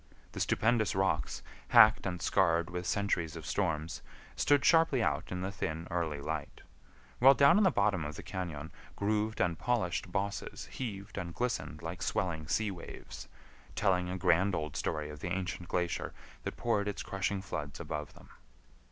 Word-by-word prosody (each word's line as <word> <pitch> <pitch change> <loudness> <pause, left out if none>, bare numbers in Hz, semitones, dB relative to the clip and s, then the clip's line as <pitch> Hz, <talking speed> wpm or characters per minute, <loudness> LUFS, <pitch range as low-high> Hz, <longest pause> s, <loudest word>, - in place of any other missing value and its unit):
The - - -7
stupendous 110 -4 +2
rocks, 95 -5 0 0.2
hacked 110 -4 +7
and 90 -2 -3
scarred 85 -2 +2
with 90 0 -4
centuries 90 -6 0
of 80 -3 -7
storms, 80 -3 -1 0.3
stood 145 -2 +3
sharply 160 -7 +5
out - - -1
in 90 0 -3
the 95 +1 -2
thin 80 -3 -4
early 80 -4 -1
light, 75 0 -5 0.6
while 135 +3 +8
down 140 +8 +6
in - - +4
the 190 - +6
bottom 100 - +1
of 75 0 -5
the - - -8
cañon 85 -4 -5 0.2
grooved 105 +2 0
and 85 -2 +1
polished 115 -8 0
bosses 100 0 -3
heaved 100 -5 -5
and 85 -3 -6
glistened 115 -9 -2
like 85 +2 -5
swelling 80 -7 -1
sea 105 +5 +1
waves, 90 -3 -9 0.5
telling 90 -3 +2
a 90 - -3
grand 90 +1 +3
old 75 -2 -3
story 75 -1 -2
of 75 - -9
the 85 - -4
ancient 90 -1 -3
glacier 85 -1 -1 0.3
that - - -4
poured 105 -4 +1
its 100 - -3
crushing 95 +1 -1
floods 75 -6 -5
above 75 -3 -5
them. - - -16
90 Hz, 170 wpm, -32 LUFS, 80-105 Hz, 0.6 s, while